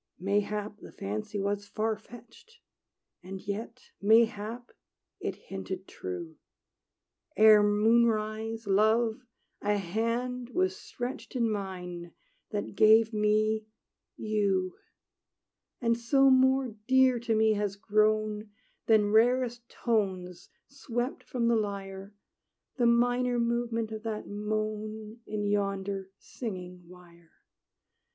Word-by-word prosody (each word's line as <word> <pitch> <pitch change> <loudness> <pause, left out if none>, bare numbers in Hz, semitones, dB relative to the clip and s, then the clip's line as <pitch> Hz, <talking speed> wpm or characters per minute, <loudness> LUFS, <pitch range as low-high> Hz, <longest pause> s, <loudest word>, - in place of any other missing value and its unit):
Mayhap 205 +2 -1
the - - -12
fancy 105 - -4
was 200 +1 -2
far 220 +2 -1
fetched; 240 - -16 0.6
And 190 +2 -7
yet, 220 +5 -6
mayhap, 225 +2 +2 0.5
it - - -3
hinted - - -7
true. 355 -4 -7 1.0
Ere 215 -1 +8
moonrise, 220 +1 +2
Love, 220 +4 +2 0.4
a 205 0 +1
hand 230 +6 -2
was 370 +1 +2
stretched 255 -5 -7
In 230 -3 +1
mine, 180 -4 -5 0.4
that 205 -2 -4
gave 220 +2 +5
me 215 +1 +1 0.5
you! 200 -4 0 1.0
And 230 -2 +2
so 270 +3 +4
more 260 0 +4 0.2
dear 260 -1 +5
to 230 -1 0
me 220 0 +4
has 205 -1 -1
grown, 215 0 +1 0.4
Than 210 -2 +4
rarest 240 +1 +2
tones 185 -6 -2 0.2
swept 250 -2 -4
from 240 -2 -1
the 235 - +4
lyre, 200 -1 -4 0.6
The 240 -2 +3
minor 245 +1 +2
movement 235 -1 -1
of 220 -1 -5
that 220 -1 -4
moan 215 +1 -4
In 210 -1 -3
yonder 195 -1 -1
singing 180 -6 -7
wire. 170 -2 -17
215 Hz, 105 wpm, -29 LUFS, 205-235 Hz, 1.0 s, Ere